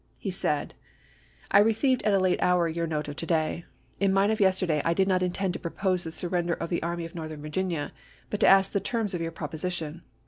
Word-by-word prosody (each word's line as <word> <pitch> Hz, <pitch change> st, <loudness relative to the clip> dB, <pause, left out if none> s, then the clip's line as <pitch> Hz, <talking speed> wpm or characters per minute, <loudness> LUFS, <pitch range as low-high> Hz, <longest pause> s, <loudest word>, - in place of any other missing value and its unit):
He 195 Hz, -, -3 dB
said: 150 Hz, -5 st, -1 dB, 0.8 s
I 200 Hz, -, +7 dB
received 225 Hz, +5 st, +3 dB
at 210 Hz, -, +2 dB
a -, -, +5 dB
late 185 Hz, -1 st, +1 dB
hour 180 Hz, -1 st, +3 dB
your 165 Hz, +1 st, -2 dB
note 150 Hz, -2 st, -2 dB
of 145 Hz, -, -6 dB
to -, -, -2 dB
day. 160 Hz, 0 st, 0 dB, 0.3 s
In 195 Hz, -1 st, +3 dB
mine 195 Hz, +2 st, +3 dB
of 220 Hz, -, -1 dB
yesterday 185 Hz, -6 st, +2 dB
I 165 Hz, 0 st, +1 dB
did 190 Hz, +1 st, +2 dB
not 185 Hz, -2 st, +2 dB
intend 180 Hz, +1 st, -1 dB
to -, -, -5 dB
propose 185 Hz, +1 st, -1 dB
the -, -, -3 dB
surren 175 Hz, +1 st, -2 dB
der 170 Hz, -, +1 dB
of 170 Hz, +1 st, -5 dB
the 170 Hz, -, 0 dB
Army 170 Hz, 0 st, -3 dB
of 165 Hz, -, -10 dB
Northern 155 Hz, -3 st, -7 dB
Virginia, 165 Hz, 0 st, -2 dB, 0.4 s
but 210 Hz, -, -2 dB
to -, -, +4 dB
ask 195 Hz, 0 st, +6 dB
the 200 Hz, -, +2 dB
terms 210 Hz, 0 st, -2 dB
of 175 Hz, -, -2 dB
your 165 Hz, -, -2 dB
proposition. 165 Hz, +1 st, -4 dB
175 Hz, 235 wpm, -27 LUFS, 165-195 Hz, 0.8 s, I